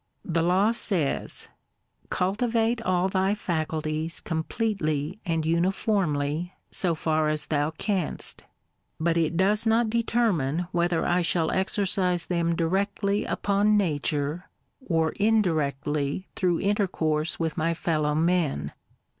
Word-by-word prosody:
The 165 -1 0
law 185 +6 +3
says, 185 -10 -1 0.2
— - - -50
" - - -36
Cultivate 225 +4 +1
all 185 -3 +1
thy 190 +1 +1
faculties 160 -3 -2
completely 160 -1 -2
and 165 -2 0
uniformly, 170 -2 0 0.2
so 175 -3 +1
far 155 -1 +1
as 155 0 0
thou 150 -1 0
canst;" 180 +2 -2 0.3
— - - -48
but 165 +1 +1
it 165 0 +1
does 210 +4 +2
not 225 0 +3
determine 205 - +1
whether 175 -1 +1
I 175 +1 +2
shall 170 -1 +1
exercise 190 -2 0
them 170 -1 0
directly 200 +4 0
upon 205 +1 +2
Nature, 150 -2 -1 0.3
or 165 -7 +1
indirectly 155 -6 0
through 175 -3 +1
intercourse 170 -6 0
with 160 -2 -1
my 165 0 0
fellow 155 -3 0
men. 160 - +1
170 Hz, 120 wpm, -26 LUFS, 155-200 Hz, 0.3 s, law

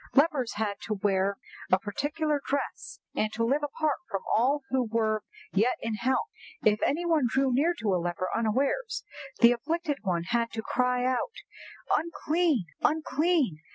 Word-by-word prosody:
Lepers 280 -4 +3
had 205 -2 -2
to 215 - -1
wear 195 0 +1 0.3
a 185 - +7
particular 290 +8 -1
dress, 280 0 -3 0.2
and 215 - 0
to 230 - -1
live 270 +6 +2
apart 295 0 0
from 195 - -3
all 270 +5 +2
who 260 -1 +2
were 215 -1 +1 0.3
yet 220 +6 +2
in 230 - -3
health. 245 +5 0 0.4
If 210 0 +4
any 335 +5 +1
one 315 -7 +3
drew 265 +1 +2
near 320 +7 +3
to 210 -4 0
a 180 - +1
leper 175 +1 -2
unawares, 265 - 0 0.4
the 235 0 +9
afflicted 295 +4 -1
one 175 -4 0
had 230 +5 0
to 220 -1 -3
cry 250 +1 +1
out 260 - 0 0.6
'Unclean! 325 - +1 0.2
unclean! 305 - +1
250 Hz, 155 wpm, -28 LUFS, 215-295 Hz, 0.6 s, the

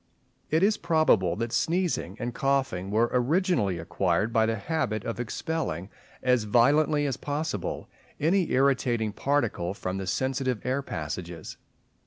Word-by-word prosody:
It 160 +4 +2
is 210 +2 +4
probable 155 - +3
that 115 +1 -3
sneezing 165 - 0
and 120 0 -3
coughing 130 -10 0
were 115 +3 +2
originally 130 - +2
acquired 85 +5 0
by 110 -2 +3
the 115 - 0
habit 110 -2 -2
of 115 - -4
expelling, 115 - -3 0.3
as 125 -3 +3
violently 145 +7 +3
as 135 -3 -1
possible, 145 - -3 0.3
any 175 +4 +2
irritating 125 -5 +2
particle 115 -11 0
from 95 -1 -3
the 95 - -5
sensitive 130 0 -1
air 130 +2 0
passages. 85 - -6
120 Hz, 135 wpm, -27 LUFS, 100-145 Hz, 0.3 s, is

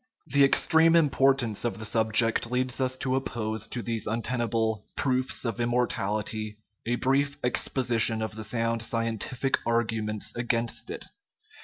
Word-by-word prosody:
The 140 -1 +3
extreme 160 +4 +5
importance 135 -7 +3
of 120 - -2
the 110 - -6
subject 115 +1 +2
leads 125 +1 0
us 130 0 0
to 130 0 -1
oppose 110 -4 -2
to 120 - -5
these 115 0 -2
untenable 115 -2 -1
" - - -47
proofs 130 -1 0
of 115 -1 -2
immortality 110 -3 -1 0.2
" 105 - -52
a 120 - +1
brief 140 +3 +1
exposition 115 -3 +1
of 110 -1 -5
the 110 - -6
sound 115 +1 -1
scientific 115 +3 -1
arguments 110 -2 -1
against 120 -1 -1
it. - - -6
115 Hz, 145 wpm, -27 LUFS, 110-130 Hz, 0.2 s, extreme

